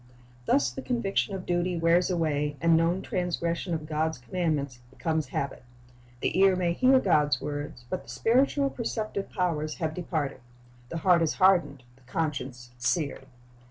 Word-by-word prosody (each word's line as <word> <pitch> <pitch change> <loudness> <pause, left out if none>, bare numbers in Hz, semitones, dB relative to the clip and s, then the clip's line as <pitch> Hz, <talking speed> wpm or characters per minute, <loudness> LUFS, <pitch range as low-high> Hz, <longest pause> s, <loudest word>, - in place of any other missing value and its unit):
Thus 135 -3 +3
the - - -6
conviction 210 -4 -1
of 185 - -6
duty 175 0 0
wears 165 +2 +3
away, 150 -4 0
and 165 0 +4
known 170 +3 +2
transgression 175 -2 -2
of 155 -1 -5
God's 160 +1 -1
commandments 145 -2 -2
becomes 155 +3 -2
habit. 140 -2 -4 0.6
The - - 0
ear 195 -1 +6
may 175 -2 +1
hear 260 +6 +5
God's 150 - +2
word, 145 0 -4
but 180 +8 -3
the - - -17
spiritual 275 +4 +2
perceptive 215 -4 -3
powers 160 -5 -1
have 160 -3 -2
departed. 155 -6 -3 0.5
The 170 - -4
heart 175 0 +4
is 165 - +1
hardened, 180 -9 +3
the - - -24
conscience 130 -3 -4
seared. 140 +1 -1
165 Hz, 155 wpm, -28 LUFS, 145-185 Hz, 0.6 s, ear